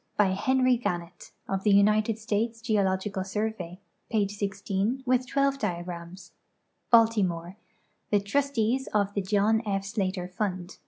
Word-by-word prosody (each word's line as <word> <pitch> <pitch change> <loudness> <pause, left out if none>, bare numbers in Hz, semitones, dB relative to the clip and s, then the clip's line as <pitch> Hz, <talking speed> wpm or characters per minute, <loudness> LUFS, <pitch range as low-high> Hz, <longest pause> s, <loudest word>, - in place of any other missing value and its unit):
By 205 -2 +4
Henry 255 +5 +2
Gannett, 175 -5 -4 0.2
of 195 0 -1
the 210 - +3
United 210 +2 +4
States 225 +1 -1
Geo 220 -3 +1
logical 190 0 -1
Survey. 195 -3 -4 0.3
Pp. 200 -2 -1
10, 210 +7 0
with 255 0 +2
12 275 +1 +1
diagrams. 175 -2 -5 0.6
Baltimore: 200 -6 +3 0.5
The 205 - +3
Trustees 260 +3 0
of 205 -1 +2
the 200 - 0
John 210 +3 +2
F. 195 -2 -2
Slater 195 -3 -2
Fund. 185 -1 -4
205 Hz, 130 wpm, -27 LUFS, 190-225 Hz, 0.6 s, By